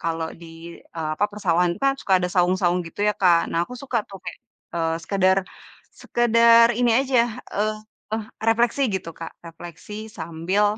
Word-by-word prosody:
kalau 165 -1 -2
di, 165 0 -11
e 165 - -9 0.2
apa 205 - +2
persawahan 175 -4 +1
kan 275 0 +3
suka 190 - +2
ada 180 - -1
saung-saung 180 0 +2
gitu 165 - -9
ya 210 - +1
Kak, 175 -3 +3
nah, 170 +1 +1
aku 250 - -13
suka 260 -3 -1
tuh 195 -1 -10
kayak 175 - -6 0.4
e - - -2 0.2
sekedar 190 +1 +2 0.6
sekedar 230 0 +5
ini 245 -1 +3
aja 265 -3 +2 0.3
eee, 215 +1 0 0.7
refleksi 235 +4 +2
gitu 180 -3 -4
Kak. 165 - -7
Refleksi 170 +4 -10 0.2
sambil 170 +5 -1
185 Hz, 155 wpm, -23 LUFS, 170-225 Hz, 0.7 s, sekedar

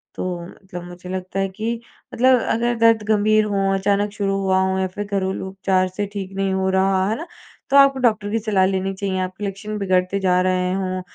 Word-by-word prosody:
तो - - -4 0.2
मतलब 180 -2 -10
मुझे 180 +1 -10
लगता 185 +1 -4
है 195 0 0
कि 230 +4 -4 0.3
मतलब 255 +1 +4
अगर 240 +1 +1
दर्द 230 -1 +4
गंभीर 215 0 +3
हो, 195 -1 0
अचानक 200 +1 +1
शुरू 195 -2 -1
हुआ 190 -1 +2
हो, 190 0 0
या 190 - 0
फिर 205 +3 -6
घरेलू 190 -1 -2
उपचार 190 -1 +1
से 195 +3 -3
ठीक 195 -2 -5
नहीं 195 -1 0
हो 190 0 0
रहा 190 0 +2
है, 230 +10 -3 0.4
तो 280 - +5
आपको 275 -1 +6
डॉक्टर 215 -4 +1
की 225 - +1
सलाह 205 -4 +2
लेनी 190 0 -1
चाहिए। 190 -1 -2
आपके 185 +2 -4
लक्षण 210 +2 -5
बिगड़ते 185 0 +1
जा 180 -1 +2
रहे 185 0 +1
हो। 185 -1 -2
195 Hz, 205 wpm, -21 LUFS, 190-210 Hz, 0.4 s, आपको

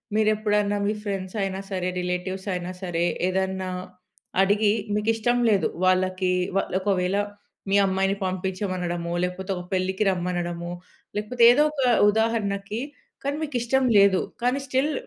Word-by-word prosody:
మీరెప్పుడన్నా 210 -1 +2
మీ 210 - +1
ఫ్రెండ్స్ 195 -2 -4
అయినా 195 0 -2
సరే, 185 -1 -1
రిలేటివ్స్ 180 +2 -3
అయినా 180 0 -4
సరే, 175 -2 0 0.2
ఏదన్నా 190 0 -1 0.7
అడిగి 205 +2 +3 0.2
మీకు 210 +1 0
ఇష్టం 240 +2 +1
లేదు. 200 -3 +3 0.2
వాళ్ళకి 185 0 +2 0.3
వాళ్ళొకవేళ 190 0 0 0.5
మీ 195 - +3
అమ్మాయిని 195 +1 +1
పంపించమనడమో, 185 -2 -2
లేకపోతే 180 +2 -3
ఒక 180 - -5
పెళ్ళికి 190 +2 0
రమ్మనడమో, 175 -1 -2 0.5
లేకపోతే 235 +3 0
ఏదో 285 +5 +4
ఒక 290 -3 -3 0.3
ఉదాహరణకి 215 -1 -1 0.4
కానీ 280 +1 -1
మీకు 295 -3 -5
ఇష్టం 265 +3 +1 0.2
లేదు. 195 -1 +5 0.2
కానీ 250 +3 +2
స్టిల్ 275 +3 +1
195 Hz, 125 wpm, -25 LUFS, 185-215 Hz, 0.7 s, లేదు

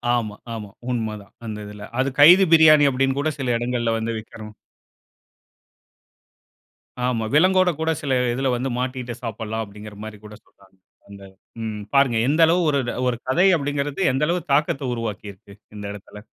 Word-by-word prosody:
ஆமா, 110 -3 -3 0.2
ஆமா 105 -2 -7 0.2
உண்மதான் 110 -4 -4
அந்த 110 -1 -5
இதில. 105 0 -10
அது 135 +1 +2
கைதி 180 +6 +8
பிரியாணி 155 -2 +7
அப்டின்னுகூட 135 +3 0
சில 125 -2 0
இடங்கள்ல 120 -1 -1
வந்து 115 +1 -3
விக்கணும். 110 -1 -11 2.5
ஆமா 120 -3 -1
விலங்கோட 185 +4 +4
கூட 160 - -1
சில 140 - -3 0.2
இதில 135 +2 -1
வந்து 125 +2 -2
மாட்டிக்கிட்டு 125 -2 -4
சாப்பிடலாம் 110 0 -4
அப்டின்கிற 105 0 -11
மாரி 110 -1 -8
கூட 105 0 -11
சொல்றாங்க. 95 -1 -25 0.3
அந்த 100 -1 -12 0.4
ம் 105 -2 -5
பாருங்க. 135 -4 +3
எந்த 155 +4 +2
அளவு 175 +3 +2 0.5
ஒரு 120 - -2
கதை 175 +9 +3
அப்டின்கிறது 145 +3 -3
எந்த 135 +3 +1
அளவு 175 +2 0
தாக்கத்த 140 -2 0
உருவாக்கிருக்கு 105 -3 -7 0.2
இந்த 105 -1 -7
இடத்தில. 105 0 -11
120 Hz, 145 wpm, -22 LUFS, 105-140 Hz, 2.5 s, கைதி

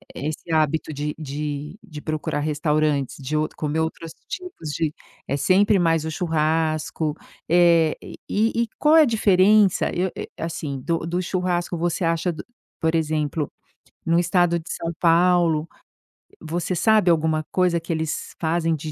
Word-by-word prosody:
eh, 140 - -4
esse 155 +2 -7
hábito 155 0 +1
de 150 0 -3
de 150 +3 -5
de 155 -8 -10
procurar 155 -1 -2
restaurantes, 150 -2 0
de 145 +3 -2
outro 155 - -2
comer 155 +1 -1
outros 160 0 -4 0.2
tipos 360 - -6
de 155 0 -1 0.4
é 140 - -1
sempre 195 +6 +4
mais 165 -3 +2
o - - -2
churrasco. 155 -1 0 0.3
Eh, 170 -2 +4 0.3
e 225 +2 +1
e 235 - -4
qual 305 +1 +5
é 320 - +8
a - - +4
diferença 210 -3 +4
eu 180 +1 0
eu - - -4
eh, - - -8 0.2
assim, 155 -5 -4
do 165 +3 -1
do 175 +2 -1
churrasco? 180 -1 -1
Você 175 +2 -1
acha 165 +1 0
do 155 - -8 0.4
por 160 0 +1
exemplo, 155 -1 -1 0.6
no 165 +1 +3
estado 175 0 +2
de 160 - -12
São 165 0 -3
Paulo, 170 -2 +3 0.8
você 170 +3 -2
sabe 215 0 +4
alguma 160 -1 +2
coisa 180 -2 +2
que 165 - -7
eles 160 -1 -3
fazem 165 0 +1
de 155 0 -6
165 Hz, 160 wpm, -23 LUFS, 155-175 Hz, 0.8 s, é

